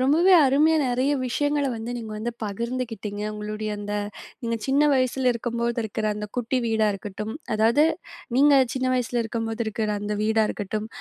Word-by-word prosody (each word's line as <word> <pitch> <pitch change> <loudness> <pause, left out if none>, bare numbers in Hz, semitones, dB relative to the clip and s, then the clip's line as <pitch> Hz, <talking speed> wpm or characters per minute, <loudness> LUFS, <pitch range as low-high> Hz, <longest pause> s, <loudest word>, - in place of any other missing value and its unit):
ரொம்பவே 315 +8 +4
அருமையா 295 +4 +4
நெறைய 255 +4 +1
விஷயங்கள 290 +3 0
வந்து 225 +1 -5
நீங்க 225 -2 -6
வந்து 230 +3 -3
பகிர்ந்துக்கிட்டீங்க. 220 -1 -4
உங்களுடைய 210 0 -4
அந்த 205 0 -4 0.5
நீங்க 230 -1 -1
சின்ன 275 +2 +3
வயசில 255 -1 +2
இருக்கும்போது 235 0 -2
இருக்கிற 220 0 -4
அந்த 210 0 -5
குட்டி 250 +2 0
வீடா 220 -1 +2
இருக்கட்டும், 210 +2 -6 0.2
அதாவது 230 +7 +4 0.5
நீங்க 290 +2 +6 0.2
சின்ன 260 -1 -1
வயசில 245 -1 0
இருக்கும்போது 225 0 -3
இருக்கிற 220 0 -2
அந்த 210 +1 -2
வீடா 220 +1 +3
இருக்கட்டும், 210 +1 -3
230 Hz, 155 wpm, -25 LUFS, 215-255 Hz, 0.5 s, நீங்க